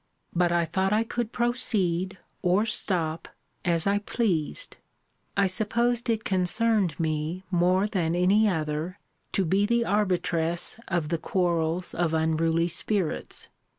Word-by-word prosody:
But 175 Hz, 0 st, +2 dB
I 170 Hz, -1 st, +2 dB
thought 190 Hz, +4 st, 0 dB
I 215 Hz, +2 st, +3 dB
could 235 Hz, 0 st, -3 dB
proceed, 195 Hz, -7 st, 0 dB, 0.2 s
or 190 Hz, +3 st, +2 dB
stop, 170 Hz, -7 st, -1 dB, 0.4 s
as 170 Hz, -2 st, +1 dB
I 200 Hz, +1 st, +2 dB
pleased. 205 Hz, -, -1 dB, 0.6 s
I 200 Hz, -, +4 dB
supposed 235 Hz, +5 st, +1 dB
it 225 Hz, -1 st, 0 dB
concerned 195 Hz, -1 st, +1 dB
me, 160 Hz, +3 st, -2 dB
more 180 Hz, +2 st, +3 dB
than 175 Hz, -6 st, 0 dB
any 200 Hz, +5 st, +4 dB
other, 160 Hz, +1 st, -2 dB, 0.4 s
to 195 Hz, -, +1 dB
be 195 Hz, +5 st, +2 dB
the 235 Hz, +1 st, +2 dB
arbitress 180 Hz, -3 st, 0 dB
of 170 Hz, -5 st, -1 dB
the 165 Hz, -1 st, -1 dB
quarrels 175 Hz, -1 st, 0 dB
of 165 Hz, -2 st, 0 dB
unruly 160 Hz, +1 st, +1 dB
spirits. 180 Hz, 0 st, -1 dB
180 Hz, 130 wpm, -26 LUFS, 165-210 Hz, 0.6 s, I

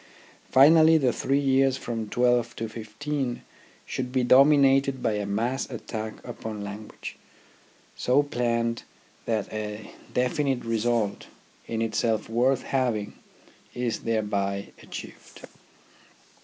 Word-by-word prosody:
Finally, 160 Hz, +4 st, +7 dB
the 130 Hz, -5 st, +2 dB
three 135 Hz, +1 st, 0 dB
years 135 Hz, -1 st, +3 dB
from 115 Hz, -3 st, -4 dB
twelve 120 Hz, 0 st, +2 dB
to 115 Hz, -, -3 dB
fifteen 120 Hz, +4 st, -4 dB, 0.4 s
should 125 Hz, -1 st, -4 dB
be 130 Hz, -1 st, +1 dB
dominated 135 Hz, 0 st, +5 dB
by -, -, +2 dB
a 105 Hz, -1 st, -2 dB
mass 115 Hz, +6 st, -1 dB
attack 110 Hz, -3 st, -5 dB
upon 110 Hz, -2 st, -6 dB
language, 105 Hz, +1 st, -8 dB, 0.8 s
so 130 Hz, +4 st, +3 dB
planned 115 Hz, -4 st, -1 dB, 0.4 s
that 110 Hz, -3 st, -1 dB
a 105 Hz, 0 st, -5 dB, 0.2 s
definite 130 Hz, 0 st, 0 dB
result, 115 Hz, -2 st, 0 dB, 0.4 s
in 115 Hz, 0 st, -1 dB
itself 110 Hz, 0 st, 0 dB
worth 125 Hz, +3 st, +2 dB
having, 120 Hz, -6 st, -1 dB, 0.6 s
is 120 Hz, -2 st, -1 dB
thereby 100 Hz, -3 st, -1 dB
achieved. -, -, -10 dB
120 Hz, 110 wpm, -26 LUFS, 110-135 Hz, 0.8 s, Finally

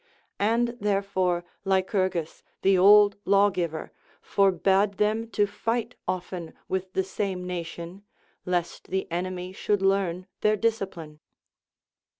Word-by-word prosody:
And 230 Hz, +3 st, +2 dB
therefore 195 Hz, -4 st, 0 dB, 0.2 s
Lycurgus, 190 Hz, -3 st, 0 dB, 0.2 s
the 195 Hz, 0 st, +5 dB
old 205 Hz, +2 st, +7 dB
lawgiver, 190 Hz, -5 st, +1 dB, 0.3 s
forbade 195 Hz, +1 st, +2 dB
them 215 Hz, +3 st, 0 dB
to 205 Hz, -1 st, +2 dB
fight 230 Hz, +4 st, -2 dB
often 180 Hz, -2 st, -4 dB
with 190 Hz, 0 st, -3 dB
the 190 Hz, -, +1 dB
same 190 Hz, -1 st, -3 dB
nation, 175 Hz, +1 st, -6 dB, 0.4 s
lest 175 Hz, -1 st, -2 dB
the 190 Hz, 0 st, -1 dB
enemy 180 Hz, +1 st, -3 dB
should 205 Hz, 0 st, 0 dB
learn 190 Hz, -2 st, +1 dB, 0.2 s
their 215 Hz, 0 st, +3 dB
discipline. 190 Hz, -9 st, -2 dB
190 Hz, 110 wpm, -26 LUFS, 180-205 Hz, 0.4 s, old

